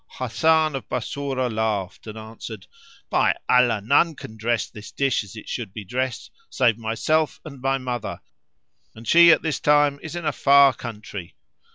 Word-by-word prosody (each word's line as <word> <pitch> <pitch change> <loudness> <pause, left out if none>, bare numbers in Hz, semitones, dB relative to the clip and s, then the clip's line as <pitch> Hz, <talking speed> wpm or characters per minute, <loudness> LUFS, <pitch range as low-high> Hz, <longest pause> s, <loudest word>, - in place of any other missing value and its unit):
Hasan 155 +5 +2
of 135 - -7
Bassorah 130 0 -2
laughed 110 -3 -2
and 110 0 -7
answered, 110 -2 -9 0.5
"By - - +3
Allah, 125 -4 +3
none 145 +7 +3
can 110 - -10
dress 115 +1 -1
this 105 0 -11
dish 135 -4 0
as 100 +1 -13
it 110 - -10
should 110 -6 -5
be 105 -2 -7
dressed 125 +3 -3 0.2
save 120 -3 +2
myself 130 +8 0
and 140 -4 -10
my 135 +1 +1
mother, 125 -2 -4 0.8
and 110 +1 -12
she 170 0 +8
at - - +3
this 160 -4 -1
time 145 -1 +3
is 160 +1 -7
in 175 -2 -5
a 150 - +2
far 140 -1 +5
country." 105 -6 -8
125 Hz, 170 wpm, -23 LUFS, 110-140 Hz, 0.8 s, she